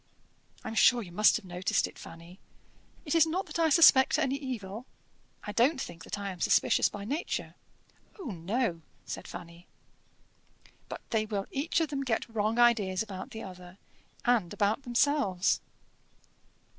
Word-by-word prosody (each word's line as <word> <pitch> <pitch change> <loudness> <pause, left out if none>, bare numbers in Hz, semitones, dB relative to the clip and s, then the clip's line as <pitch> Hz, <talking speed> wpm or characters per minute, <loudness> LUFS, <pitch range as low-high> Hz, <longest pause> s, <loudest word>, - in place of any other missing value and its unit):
I - - -7
am - - -6
sure 240 +1 +4
you 175 - -11
must 210 +5 +4
have 225 - -11
noticed 180 0 0
it, - - -10
Fanny. 170 +3 -12 0.7
It 295 - -2
is 330 -1 +5
not 365 +5 -2
that - - -6
I 325 -1 +3
suspect 280 -4 +6
any 270 - 0
evil. 245 -5 -6 0.6
I 210 - -5
don't 260 +7 +2
think 170 -9 -7
that - - -5
I 200 -1 -4
am 180 -2 -10
suspicious - - +3
by 200 -1 -8
nature." 290 +9 -3 0.7
"Oh! 310 - -5
no," 180 +1 -2 0.2
said - - -7
Fanny. 175 0 -10 1.2
"But - - -7
they 215 -1 0
will 200 -2 -3
each 290 +5 0
of 320 - 0
them 280 -2 -3
get 235 -4 -1
wrong 220 0 -1
ideas 220 -5 +3
about 190 -4 -8
the 225 - -8
other, 180 -1 -11 0.5
and 235 -8 +2
about 205 +6 0
themselves. 245 -7 +1
220 Hz, 160 wpm, -29 LUFS, 185-265 Hz, 1.2 s, suspect